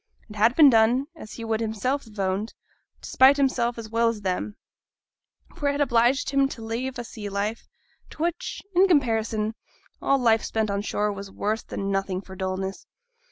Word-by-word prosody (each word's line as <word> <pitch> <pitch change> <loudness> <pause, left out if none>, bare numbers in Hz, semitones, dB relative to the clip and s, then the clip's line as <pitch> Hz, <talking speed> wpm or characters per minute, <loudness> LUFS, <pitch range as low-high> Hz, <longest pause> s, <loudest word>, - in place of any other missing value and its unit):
It - - -10
had 225 +4 +3
been 295 -4 +8
done, 235 +4 +4
as 215 -9 -10
he 230 - -7
would 220 -1 0
himself 230 +5 -2
have 215 -1 -16
owned, 195 +3 -1 0.5
to - - -7
spite 265 +2 +6
himself 245 -4 +1
as 230 -1 -6
well 230 0 +2
as 225 -2 -4
them; 195 +2 -2 1.0
for 285 - 0
it - - 0
had 285 - -2
obliged 245 +1 +2
him 275 -1 +3
to 230 -5 -8
leave 240 +3 -3
a 240 - -4
sea 215 -3 -7
life, 205 +3 -3 0.4
to 310 - -5
which, 345 0 -3
in 370 +2 +5
comparison, 225 - +1 0.5
all 275 - +3
life 225 -4 +3
spent 220 -2 -1
on 200 0 -1
shore 210 0 -1
was 200 0 -8
worse 215 +3 -2
than 195 0 -4
nothing 195 -1 -1
for 190 -1 -11
dulness. 190 0 -4
225 Hz, 190 wpm, -25 LUFS, 205-260 Hz, 1.0 s, been